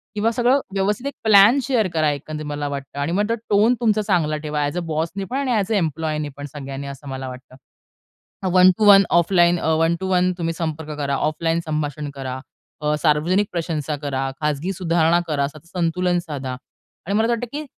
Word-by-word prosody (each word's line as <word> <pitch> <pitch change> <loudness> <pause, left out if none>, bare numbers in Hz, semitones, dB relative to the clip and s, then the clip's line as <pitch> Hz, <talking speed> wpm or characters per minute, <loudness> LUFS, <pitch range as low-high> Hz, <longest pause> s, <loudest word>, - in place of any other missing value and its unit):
किंवा 215 +2 +1
सगळं 245 +4 +3
व्यवस्थित 210 +7 -1
प्लॅन 215 +4 +7
शेअर 240 -7 +1
करा 155 -2 +2
एकंदरीत 150 +1 -6
मला 145 0 -3
वाटतं. 140 0 -6
आणि 145 +3 -1
मग 205 +5 0 0.2
टोन 210 +4 +4
तुमचा 220 -3 +2
चांगला 170 -7 +1
ठेवा. 150 0 -1
ॲज 145 +4 -3
अ - - 0
बॉसनीपण 190 - -3
आणि 275 -2 -1
ए-एस 210 -2 0
अ, - - +3
एम्प्लॉयीनीपण, 155 -4 -2
सगळ्यांनी 140 -1 -6
असं 140 +1 -9
मला 130 0 -5
वाटतं. 130 0 -11 0.9
अ, - - 0
1-2-1 195 +2 +7 0.2
ऑफलाईन 175 0 +3
अ, - - -2
1 165 +1 +2
टू 190 - -3
1 180 0 +3
तुम्ही 165 -1 -2
संपर्क 160 -2 -4
करा. 140 -1 -1
ऑफलाईन 165 +3 0
संभाषण 150 -1 -3
करा. 130 -1 -5 0.4
अ, 150 0 +1
सार्वजनिक 170 +6 +2
प्रशंसा 160 -3 -2
करा, 135 -2 -2
खाजगी 150 +5 -1
सुधारणा 170 -2 +2
करा, 145 -3 0
असं 145 +2 -5
संतुलन 175 +1 0
साधा 145 -6 -5 0.5
आणि 195 - -2
मला 220 - +3
असं 235 - +2
वाटतं 235 +1 -3
की 300 +1 -5
165 Hz, 180 wpm, -21 LUFS, 150-195 Hz, 0.9 s, प्लॅन